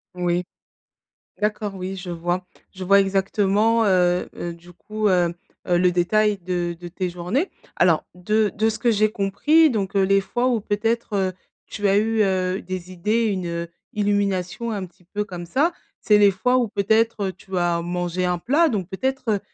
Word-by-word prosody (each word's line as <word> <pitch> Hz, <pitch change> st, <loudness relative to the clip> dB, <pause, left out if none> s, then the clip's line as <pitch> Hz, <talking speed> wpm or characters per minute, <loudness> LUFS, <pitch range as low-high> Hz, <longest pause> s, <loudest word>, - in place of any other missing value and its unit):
Oui. 180 Hz, 0 st, 0 dB, 1.0 s
D'accord, 210 Hz, -1 st, -1 dB
oui 190 Hz, 0 st, -5 dB
je 185 Hz, -1 st, -7 dB
vois, 175 Hz, +2 st, -2 dB, 0.3 s
je 190 Hz, -1 st, -7 dB
vois 200 Hz, +2 st, +6 dB
exactement, 200 Hz, +3 st, +2 dB
heu, 180 Hz, -3 st, +2 dB
heu, 175 Hz, -, -4 dB
du 175 Hz, +1 st, -16 dB
coup, 215 Hz, +4 st, -2 dB
hem, 175 Hz, -3 st, +2 dB, 0.3 s
heu, 175 Hz, -, +3 dB
le 180 Hz, 0 st, +4 dB
détail 205 Hz, +4 st, +2 dB
de 175 Hz, -1 st, -3 dB
de 175 Hz, -, -7 dB
tes 180 Hz, +1 st, -3 dB
journées. 180 Hz, -, -2 dB, 0.3 s
Alors 165 Hz, -4 st, +3 dB
de 210 Hz, +4 st, +1 dB
de 220 Hz, +1 st, +1 dB
ce -, -, -5 dB
que 235 Hz, +1 st, +2 dB
j'ai 215 Hz, 0 st, +2 dB
compris 215 Hz, +12 st, +3 dB
donc 200 Hz, -6 st, -2 dB
heu, 195 Hz, -, +4 dB
les 195 Hz, +1 st, +3 dB
fois 240 Hz, +6 st, -1 dB
où 240 Hz, -3 st, +1 dB
peut-être, 225 Hz, +3 st, -1 dB
heu, 190 Hz, -1 st, 0 dB, 0.3 s
tu 205 Hz, -1 st, -2 dB
as 195 Hz, -, +4 dB
eu, 220 Hz, +1 st, +2 dB
heu, 185 Hz, -1 st, 0 dB
des 185 Hz, 0 st, -6 dB
idées, 210 Hz, +6 st, 0 dB
une, 190 Hz, -4 st, -1 dB
heu, 170 Hz, 0 st, -4 dB, 0.2 s
illumination, 205 Hz, 0 st, -1 dB
un 200 Hz, -4 st, -3 dB
petit 180 Hz, +1 st, -25 dB
peu 210 Hz, 0 st, -1 dB
comme 180 Hz, -4 st, -7 dB
ça. 285 Hz, -, +1 dB, 0.3 s
C'est 210 Hz, -1 st, +4 dB
les 205 Hz, -1 st, +6 dB
fois 250 Hz, +7 st, +1 dB
où 245 Hz, -3 st, +1 dB
peut-être, 220 Hz, +3 st, +1 dB
heu, -, -, -9 dB
tu 190 Hz, 0 st, -5 dB
as 175 Hz, -1 st, +1 dB
mangé 175 Hz, +1 st, -2 dB
un 180 Hz, 0 st, 0 dB
plat 295 Hz, -, +3 dB
donc 200 Hz, -, -2 dB
peut-être 245 Hz, 0 st, -1 dB
195 Hz, 185 wpm, -23 LUFS, 180-215 Hz, 1.0 s, vois